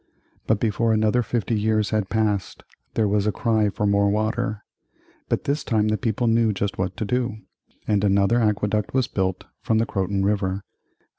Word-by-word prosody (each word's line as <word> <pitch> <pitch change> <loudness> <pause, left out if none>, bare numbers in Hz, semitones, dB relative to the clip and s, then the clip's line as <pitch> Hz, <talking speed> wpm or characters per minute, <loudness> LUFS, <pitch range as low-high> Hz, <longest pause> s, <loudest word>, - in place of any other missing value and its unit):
But 110 -2 +2
before 115 +1 +1
another 110 +3 +2
fifty 120 0 -2
years 110 -1 +1
had 110 -3 0
passed 105 -2 -1 0.3
there 110 -2 +2
was 105 0 +1
a - - +3
cry 110 -1 +1
for 105 +1 -2
more 100 0 +3
water, 110 +1 -1 0.7
But - - 0
this 145 +2 -1
time 110 -3 +1
the 110 - +2
people 115 0 -1
knew 115 -1 +3
just 100 0 -3
what 95 -1 -2
to 110 - -2
do, 125 0 -1 0.5
and 105 -2 +1
another 100 +3 +3
aqueduct 105 +1 0
was 130 -2 +2
built 95 -6 -2 0.2
from 110 - +1
the 115 - +2
Croton 95 -2 -1
River. 100 -1 0
105 Hz, 175 wpm, -23 LUFS, 100-115 Hz, 0.7 s, a